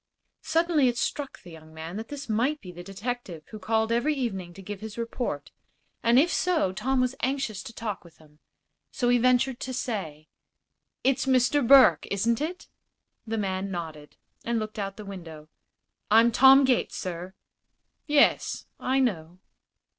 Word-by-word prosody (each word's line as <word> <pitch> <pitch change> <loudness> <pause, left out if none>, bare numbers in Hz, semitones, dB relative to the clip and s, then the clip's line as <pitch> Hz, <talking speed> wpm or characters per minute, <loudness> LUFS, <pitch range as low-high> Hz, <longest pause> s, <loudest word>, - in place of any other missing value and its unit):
Suddenly 320 -3 +2
it 240 -1 0
struck 280 +3 -3
the 175 - -12
young 160 -1 -14
man 160 +3 -7
that 220 +1 -6
this 290 -1 -7
might 245 +7 0
be 180 - -10
the 175 0 -10
detective 195 -3 -6
who 215 - -8
called 220 +3 0
every 250 +6 +1
evening 195 -10 -3
to 195 - -10
give 205 +1 -7
his 220 0 -8
report, 235 +1 -4 0.5
and 235 +1 +4
if 330 +6 +4
so 335 - +1
Tom 260 +7 0
was 255 0 +1
anxious 255 -6 -2
to - - -9
talk 220 -3 -5
with 170 -2 -18
him. 150 -1 -22 0.5
So 245 - -1
he 245 0 +4
ventured 255 +1 +2
to 260 - -5
say: 160 - -4 0.8
"It's 270 +1 +1
Mr. 260 +2 +3
Burke, 275 0 +7
isn't 230 +6 0
it?" 345 +4 -4 0.6
The 225 0 -2
man 195 -1 -2
nodded, 160 -5 -7 0.3
and 235 0 -1
looked 215 -1 -4
out 195 -1 -3
of - - -38
the 210 - -9
window. 165 -6 -9 0.6
"I'm 225 +2 +6
Tom 270 +3 +7
Gates, 255 -2 +1
sir." 180 +1 -6 0.7
"Yes; 295 -1 +2
I 265 +1 +1
know." 180 -9 -1
225 Hz, 170 wpm, -27 LUFS, 185-260 Hz, 0.8 s, Burke